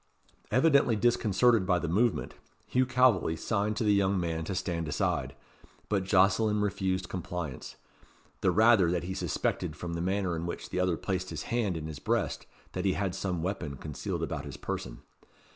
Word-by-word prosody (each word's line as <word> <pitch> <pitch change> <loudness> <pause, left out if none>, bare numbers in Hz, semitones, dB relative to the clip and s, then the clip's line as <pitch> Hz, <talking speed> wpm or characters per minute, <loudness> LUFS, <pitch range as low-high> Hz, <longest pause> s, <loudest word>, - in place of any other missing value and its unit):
Evidently 135 -2 +4
disconcerted 115 0 +3
by 90 -2 +3
the 85 - -2
movement, 110 +8 +1 0.3
Hugh 130 0 +1
Calveley 125 -10 +3
signed 105 +1 -1
to - - 0
the 105 -1 +4
young 100 -1 +2
man 80 -2 -2
to 95 - -3
stand 85 -3 -2
aside, 70 -2 -1 0.5
but 100 -3 0
Jocelyn 100 +3 +3
refused 95 -2 -1
compliance; 90 -6 -5 0.6
the - - +2
rather 110 -5 +5
that 90 0 0
he 95 +2 -4
suspected 85 -3 -2
from 85 +2 -5
the 85 - -3
manner 95 -1 0
in 85 +1 -3
which - - -6
the 90 - -1
other 90 -2 +1
placed 95 -1 -3
his - - -5
hand 105 -8 0
in 80 - -5
his 80 -2 -6
breast - - -1 0.2
that 90 - -3
he 95 -2 +2
had 95 -2 -1
some 90 -3 -2
weapon 85 -7 -3
concealed 75 +2 -4
about - - -3
his - - -7
person. - - -5
95 Hz, 175 wpm, -29 LUFS, 85-105 Hz, 0.6 s, rather